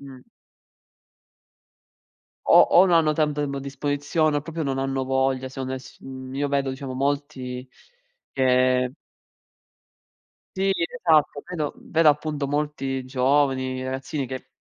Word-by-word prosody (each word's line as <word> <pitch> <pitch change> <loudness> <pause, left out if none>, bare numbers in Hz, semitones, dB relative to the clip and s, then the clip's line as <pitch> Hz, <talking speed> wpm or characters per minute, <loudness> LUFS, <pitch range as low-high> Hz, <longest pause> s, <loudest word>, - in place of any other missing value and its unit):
Mh. 135 -2 -11 2.3
O - - +9
o - - +6
non 175 -2 +4
hanno 155 -2 +2
tanto 150 -1 +1
tempo 140 -1 -3
a - - -3
disposizione 145 +3 0
o 145 - -1
proprio 165 0 -4
non 135 -1 -1
hanno 135 0 -1
voglia 130 0 +1
secondo 130 0 -4
e 130 - -4
s 130 - -13
mhmm, 130 0 -8
io 145 - +1
vedo 140 -1 0
diciamo 130 0 -6
molti 135 -2 -3 0.7
che 130 -1 +3 1.6
Sì, 195 +1 +1
esatto. 160 - +1
Vedo 155 -5 -3
vedo 160 -1 +2
appunto 150 -1 -2
molti 135 -2 -2
giovani, 130 0 +1
ragazzini 130 +2 -3
che 130 0 -7
140 Hz, 130 wpm, -24 LUFS, 130-150 Hz, 2.3 s, O